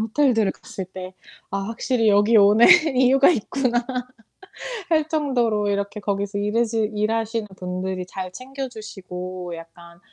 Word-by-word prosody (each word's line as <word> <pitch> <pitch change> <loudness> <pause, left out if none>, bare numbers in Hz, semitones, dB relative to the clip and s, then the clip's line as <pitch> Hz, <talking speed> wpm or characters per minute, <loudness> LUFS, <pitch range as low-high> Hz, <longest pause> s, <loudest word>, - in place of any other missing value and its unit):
호텔들을 225 -2 +2
갔을 190 - -8
때 185 0 -9 0.4
아 195 - -2
확실히 225 +2 0
여기 205 +3 +4
오는 210 +2 +6 0.3
이유가 260 +2 +5
있구나. 250 -2 0 1.1
할 310 -2 +2
정도로 245 -9 0
이렇게 200 +1 -2
거기서 200 0 -2
일해신 220 0 0
일하시는 225 +1 -1
분들이 185 0 -4
잘 185 0 -6
챙겨주시고 190 -8 -7
약간 170 +1 -13
210 Hz, 290 characters per minute, -22 LUFS, 190-235 Hz, 1.1 s, 오는